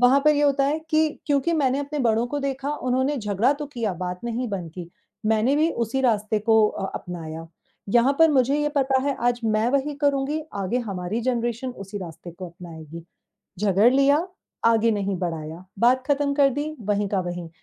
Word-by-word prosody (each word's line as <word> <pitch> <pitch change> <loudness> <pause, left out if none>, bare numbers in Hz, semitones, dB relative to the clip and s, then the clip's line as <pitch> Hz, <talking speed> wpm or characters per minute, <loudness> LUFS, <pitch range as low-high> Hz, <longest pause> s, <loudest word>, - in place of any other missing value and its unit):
वहाँ 255 +3 +5
पर 305 - +7
ये 290 - +1
होता 280 -1 +3
है 290 +3 +1
कि 315 0 +3 0.2
क्योंकि 285 +2 +1
मैंने 275 -4 +1
अपने 285 +1 -4
बड़ों 230 -2 +2
को 290 +4 -3
देखा, 275 0 -2
उन्होंने 260 +3 0
झगड़ा 215 +2 +1
तो 295 +1 -6
किया, 235 -8 -3
बात 180 0 -5
नहीं 240 +1 -2
बंद 180 -5 -4
की, 175 -1 -8 0.4
मैंने 220 +5 +3
भी 315 +2 +3
उसी 235 +3 -1
रास्ते 215 -4 +1
को 220 0 +4
अ, 195 - -4
अपनाया, 165 -2 -6 0.4
यहाँ 240 +6 +4
पर 325 -1 +6
मुझे 270 0 +3
ये 295 - +1
पता 265 -1 +2
है 280 0 -1
आज 240 0 -1
मैं 220 +1 +2
वही 280 +2 0
करुँगी, 285 +1 +1
आगे 200 +4 -1
हमारी 195 +4 -3
जनरेशन 240 0 -1
उसी 195 -3 -8
रास्ते 170 -1 -9
को 180 +2 -8
अपनाएगी। 165 -2 -10 0.6
झगड़ 205 +4 +4
लिया, 280 +5 +3 0.4
आगे 230 0 +4
नहीं 200 -2 -1
बढ़ाया, 165 -1 -5
बात 250 +4 +4
ख़त्म 285 -1 +1
कर 280 -1 +5
दी 295 +3 -3
वहीं 205 -1 0
का 195 -2 0
वहीं, 175 -1 -5
235 Hz, 190 wpm, -24 LUFS, 195-275 Hz, 0.6 s, पर